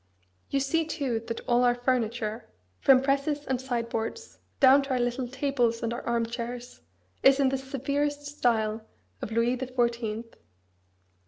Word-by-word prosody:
You 275 - +1
see 275 +5 +1
too 280 -7 -2
that 230 - -4
all 245 0 +3
our 245 -1 +4
furniture, 235 -3 -1 0.3
from 265 -1 +5
presses 285 +2 0
and 260 -1 -1
sideboards, 235 - -4 0.2
down 270 0 +7
to 275 - -7
our 260 -1 +1
little 245 +1 -1
tables 250 -3 0
and 230 0 -1
our 240 - -4
arm 235 -1 0
chairs, 235 - -6 0.4
is 270 +1 +6
in 270 -1 +4
the 270 - 0
severest 285 +2 -2
style 225 -6 0 0.4
of - - -5
Louis 230 +2 +2
the 260 +1 -4
Fourteenth. 235 -2 -1
245 Hz, 155 wpm, -28 LUFS, 235-275 Hz, 0.4 s, down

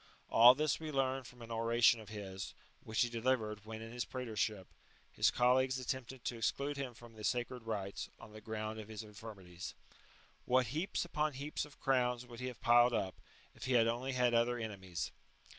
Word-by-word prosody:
All 120 +3 +9
this 150 0 +1
we 155 -1 -5
learn 135 -1 0
from 120 0 -12
an 115 - -9
oration 115 +1 +4
of 110 -2 -11
his, 95 -3 -6 0.3
which 110 - 0
he - - +1
delivered 110 -3 0
when, 110 0 -6
in 115 - -8
his 120 0 -2
praetorship, 110 -5 -2 0.5
his - - +4
colleagues 130 +2 +3
attempted 130 -1 -4
to 120 - -2
exclude 140 +6 0
him 135 -4 -4
from 115 0 -13
the 110 -1 -10
sacred 125 +1 -1
rites, 100 -3 -3
on - - -12
the 110 - -10
ground 110 0 -4
of 105 - -7
his 110 0 -6
infirmities.^® 100 -5 -9 0.7
What 130 0 +4
heaps 175 +4 -1
upon 155 -3 0
heaps 145 +3 -3
of 150 - -16
crowns 125 -3 +2
would 120 -1 -10
he 125 - -3
have 125 -4 -7
piled 120 +1 +6
up, 95 -4 0 0.4
if - - -8
he 130 - +1
had 115 -2 +6
only 120 +4 -1
had 125 -1 +3
other 120 +1 +3
ene 110 -3 -4
mies 90 -3 -4
120 Hz, 195 wpm, -36 LUFS, 110-130 Hz, 0.7 s, All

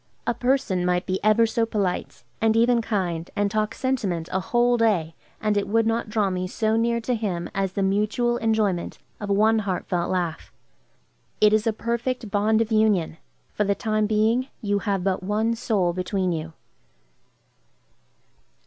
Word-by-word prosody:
A - - +1
person 245 -7 0
might 180 0 0
be 185 +1 -2
ever 215 +2 +5
so 230 +1 0
polite, 200 -5 -2 0.2
and 225 0 +3
even 235 +1 +4
kind, 180 -7 -2
and 205 -1 0
talk 215 0 -1
sentiment 200 -11 -2
a 190 - 0
whole 240 +6 +2
day, 200 -9 +1 0.3
and 215 -1 0
it 205 - 0
would 225 +2 +2
not 225 0 -1
draw 210 -3 +1
me 185 0 -2
so 220 +3 0
near 235 +1 +1
to 250 +2 -1
him 195 -7 -3
as 195 -1 -1
the 200 - -1
mutual 215 +5 +1
enjoyment 215 -6 0 0.2
of 205 -2 -5
one 215 +3 +3
heartfelt 180 -3 -2
laugh. 175 -4 -2 0.9
It 210 0 +5
is 215 +1 +2
a - - +4
perfect 235 0 -3
bond 215 +2 +2
of 225 0 -2
union; 210 -7 +2 0.4
for 210 - 0
the 200 0 +1
time 215 -2 0
being, 220 +4 +2
you 205 -3 0
have 195 -3 -1
but 190 -1 0
one 215 +4 0
soul 205 -7 0
between 185 +1 -1
you. 160 -1 -4
210 Hz, 165 wpm, -24 LUFS, 190-225 Hz, 0.9 s, ever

